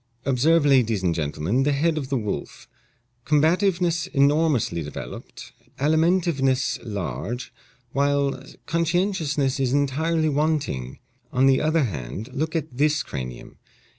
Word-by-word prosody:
"Observe, 145 +5 +3
ladies 115 -8 +3
and 85 -2 +2
gentlemen, 80 - -1
the 145 +2 +2
head 155 +3 +1
of 140 -4 -4
the 140 - +1
wolf: 105 -4 -5 0.6
combativeness 170 +3 +2
enormously 140 - +2
developed, 75 -1 -8 0.3
alimentiveness 155 -4 +2
large, 100 - -5 0.4
while 140 -1 0 0.2
conscientiousness 165 -5 0
is 130 -1 +1
entirely 155 +3 +1
wanting. 145 - -1 0.3
On 130 +1 +3
the 135 -1 +4
other 155 0 +2
hand, 100 - -5
look 155 +4 -2
at 155 -5 -3
this 150 +1 +2
cranium. 65 - -7
140 Hz, 115 wpm, -24 LUFS, 120-160 Hz, 0.6 s, the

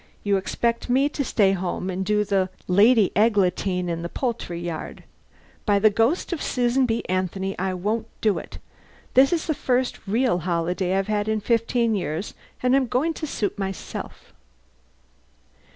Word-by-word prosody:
You 200 -1 +2
expect 235 +5 -1
me 270 +4 +3
to 290 - -2
stay 205 -6 +3
home 185 0 -2
and 185 +1 -2
do 210 +1 +2
the 195 -2 +1 0.2
Lady 205 +2 +5
Eglantine 190 -4 +2
in 165 -1 -2
the 170 - -4
poultry 230 -9 -3
yard. 170 -2 -6 0.6
By 205 -2 +3
the 215 +1 +5
ghost 235 - +1
of 325 - -4
Susan 250 +1 +1
B. 225 0 -1
Anthony, 185 +1 -2
I 185 0 -1
won't 215 +5 -2
do 210 -3 +1
it! - - -10 0.6
This 270 +1 +6
is 335 -2 0
the 315 - 0
first 255 -5 -1
real 230 -2 +2
holiday 180 +2 -1
I've 195 - 0
had 210 -1 0
in 220 0 +1
fifteen 230 +1 +1
years, 180 -1 -3 0.3
and 255 +1 +4
I'm 270 -2 +2
going 270 +8 0
to 310 - -5
suit 210 -6 -2
myself." 195 -2 -6
210 Hz, 165 wpm, -24 LUFS, 185-240 Hz, 0.6 s, This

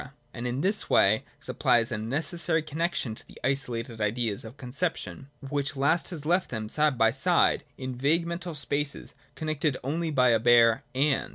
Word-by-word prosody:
and 125 0 -4
in 125 +3 -2
this 200 +4 +2
way 105 +3 +4 0.2
supplies 120 0 +1
a 110 - -1
necessary 160 +7 -1
connexion 155 -5 -2
to - - -11
the - - -15
isolated 120 -4 -2
ideas 105 0 -1
of 115 +5 -11
conception; 140 +1 -4 0.2
which 145 +3 -2
last 140 +5 +2
has 155 -5 -6
left 175 +3 +1
them 110 -3 -4
side 150 +3 +1
by 115 -1 +4
side 170 +8 +3
in 130 -1 -5
its 125 - -11
vague 165 +5 +2
mental 170 0 -5
spaces, 145 0 -3 0.2
connected 155 -3 -1
only 160 +5 -2
by 130 -4 +3
a 115 -1 +4
bare 120 +1 +5
' - - -34
and.' 140 +1 +1
135 Hz, 180 wpm, -27 LUFS, 120-160 Hz, 0.2 s, bare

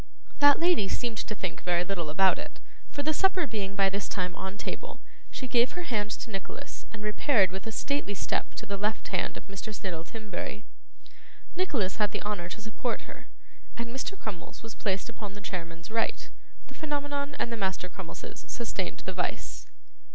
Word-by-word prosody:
That 285 -1 +9
lady 335 - +5
seemed 235 +1 0
to 215 - -1
think 185 -3 -2
very 175 -1 +3
little 175 -4 -1
about 190 +5 +6
it, - - -7 0.3
for 285 - -2
the 310 +2 +3
supper 380 0 +4
being 200 -6 -2
by 195 -1 +6
this 195 +1 -1
time 180 -2 0
on 190 +1 -4
table, - - -4 0.3
she 260 - -4
gave 245 0 +5
her 355 - -3
hand 210 -8 +1
to 225 - -4
Nicholas 195 -1 -5
and 210 -2 -7
repaired 210 -2 +5
with 190 +3 -4
a - - -1
stately 280 -3 0
step - - 0
to - - -3
the 200 0 -2
left 210 +2 0
hand 185 - +1
of - - -8
Mr. 195 +2 -5
Snittle 185 -5 -3
Timberry. 210 +1 -4 0.9
Nicholas 265 - +2
had 210 -2 +3
the - - -1
honour 205 -4 -1
to 215 - -5
support 225 +2 -1
her, - - -11 0.5
and 235 0 -2
Mr. 265 +10 -2
Crummles 205 - -6
was 225 -1 -6
placed 195 -3 0
upon 215 -4 -6
the 205 - -7
chairman's 170 -2 -4
right; 225 0 +1 0.3
the - - -13
Phenomenon 285 -1 -1
and 235 - 0
the - - +1
Master 190 -4 0
Crummleses 180 -2 -7
sustained - - -2
the - - -1
vice. - - -2
210 Hz, 190 wpm, -31 LUFS, 190-245 Hz, 0.9 s, That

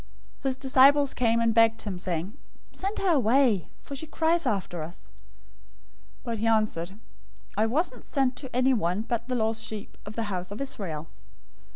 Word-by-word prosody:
His 265 -2 -1
disciples 275 +1 +5
came 230 -1 +2
and 230 -1 +2
begged 225 0 +4
him, 195 -4 -4
saying, 180 +3 -3 0.4
"Send 395 +3 -4
her 385 -2 +2
away; 245 - +3
for 280 - -8
she 315 +4 -6
cries 325 0 +1
after 190 -6 -2
us." 165 +4 -9 1.1
015:024 - - -29
But 235 -2 -3
he 225 - 0
answered, 210 -4 0 0.6
"I 215 +2 +2
wasn't 260 0 0
sent 265 -3 0
to 265 - -6
anyone 220 -7 +2
but 235 0 -2
the 255 - -1
lost 225 -1 0
sheep 215 -2 -6
of 210 - -7
the 230 - -1
house 180 0 -3
of 205 - -6
Israel." 185 - -4
230 Hz, 170 wpm, -27 LUFS, 205-265 Hz, 1.1 s, disciples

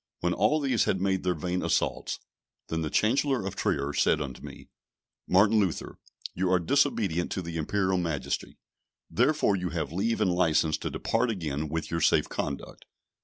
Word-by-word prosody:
When 90 0 +1
all 155 +10 +2
these 130 -6 +1
had 95 - 0
made 95 0 +1
their 90 -1 0
vain 90 +3 -2
assaults, - - -1 0.5
then 80 0 -1
the 80 - -2
Chancellor 125 - +1
of 95 - -4
Trier 70 +1 -1
said 80 - +2
unto 70 -4 -5
me, - - -10 0.6
"Martin 100 +4 +4
Luther, 95 -6 -2 0.3
you 90 +1 0
are 95 - +5
disobedient 95 - +1
to 95 - -2
the 85 -1 -5
Imperial 95 +3 0
Majesty; 80 -5 -3 0.5
therefore 125 -4 +2
you 90 -1 -2
have 75 -3 -3
leave 115 +6 0
and 95 -4 +2
licence 80 -3 +2
to - - -3
depart 115 +2 0
again 80 -7 -3
with 80 +1 -3
your 85 0 -1
safe - - +3
conduct." 70 -1 -5
90 Hz, 170 wpm, -28 LUFS, 80-105 Hz, 0.6 s, are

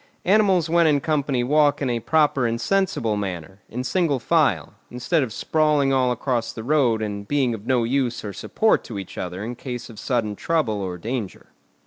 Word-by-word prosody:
Animals 190 -4 +3
when 170 0 +3
in 145 -2 +3
company 140 -4 0
walk 145 +2 +3
in 140 - -1
a 120 -1 0
proper 145 -1 +2
and 115 0 -2
sensible 155 - 0
manner, 95 -1 -5
in 125 +3 -4
single 155 +1 +1
file, 125 - +1 0.2
instead 125 +7 0
of 130 -5 -2
sprawling 150 +1 +1
all 130 -2 +2
across 120 -1 -1
the 110 - -8
road 125 -5 +2
and 100 -1 -5
being 135 -3 +1
of 110 -1 -8
no 125 -3 +2
use 125 -1 -1
or 100 - -5
support 220 - +1
to 110 - -7
each 95 - -7
other 90 +2 -5
in 120 +3 -4
case 120 -1 -7
of 110 - -12
sudden 115 -5 -1
trouble 120 -8 -1
or 90 -2 -4
danger. 110 +1 -5
125 Hz, 190 wpm, -23 LUFS, 110-150 Hz, 0.2 s, Animals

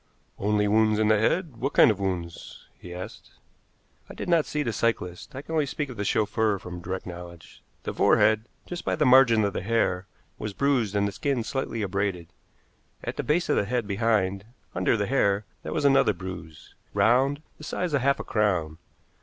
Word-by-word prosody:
"Only 105 +1 +1
wounds 110 0 +3
in 110 0 +2
the 110 -1 +4
head? 155 - 0
What 135 +5 -2
kind - - +7
of 100 - -4
wounds?" 90 -4 -5
he 90 - -10
asked. 90 +1 -9 0.8
"I - - -9
did - - -6
not 170 -3 +3
see 150 0 -1
the 115 -4 -2
cyclists. 115 +1 -2
I 135 - -6
can 160 - -7
only 155 -3 +1
speak 145 +1 -3
of 125 - -8
the 100 - -2
chauffeur 105 0 +1
from 90 -2 -8
direct 95 +2 -5
knowledge. 85 -2 -10 0.2
The - - -4
forehead, 110 +1 +3 0.2
just 175 0 -6
by - - 0
the 150 - +1
margin 125 -4 +6
of 100 - -1
the - - -3
hair, 95 -3 0 0.3
was 105 -2 -4
bruised 125 -8 +1
and 100 0 +2
the - - -3
skin 135 +1 -1
slightly 115 -3 -3
abraded. 95 -3 -2 0.7
At - - -4
the - - -1
base 165 +4 +1
of - - +2
the - - +2
head 120 +1 -1
behind, 100 -2 0 0.3
under 95 +5 +1
the 105 - 0
hair, 100 -5 +1 0.2
there - - -6
was 150 - -1
another 135 -6 +5
bruise 90 -4 -9 0.2
round, 135 +5 +3 0.2
the - - -11
size 175 +1 -3
of 140 - +2
half 140 +2 +2
a - - -3
crown. 90 -7 0
110 Hz, 200 wpm, -26 LUFS, 95-135 Hz, 0.8 s, kind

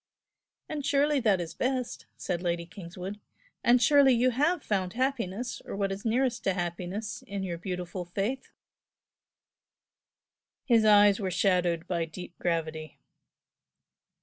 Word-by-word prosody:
"And 300 -2 -4
surely 290 +1 +2
that 210 -6 +3
is 170 -2 -5
best!" 255 -1 -2
said 175 -2 -3
Lady 170 -1 -1
Kingswood, 185 +3 -8 0.4
"and 245 +1 +5
surely 280 0 +6
you 250 +2 +3
have 300 +8 +1
found 185 -3 -1
happiness, 245 -3 -2
or - - -6
what 195 -1 -1
is 195 +1 -5
nearest 245 +2 +1
to 195 - +3
happiness, 180 +4 -4
in 200 -1 -4
your 175 -3 -4
beautiful 180 0 -4
Faith?" 200 +9 -3 2.2
His 230 -4 +4
eyes 205 -1 +6
were 195 -3 -1
shadowed 180 -3 +1
by 170 -2 0
deep 175 +2 -9
gravity. 160 -2 -2
195 Hz, 130 wpm, -29 LUFS, 175-245 Hz, 2.2 s, surely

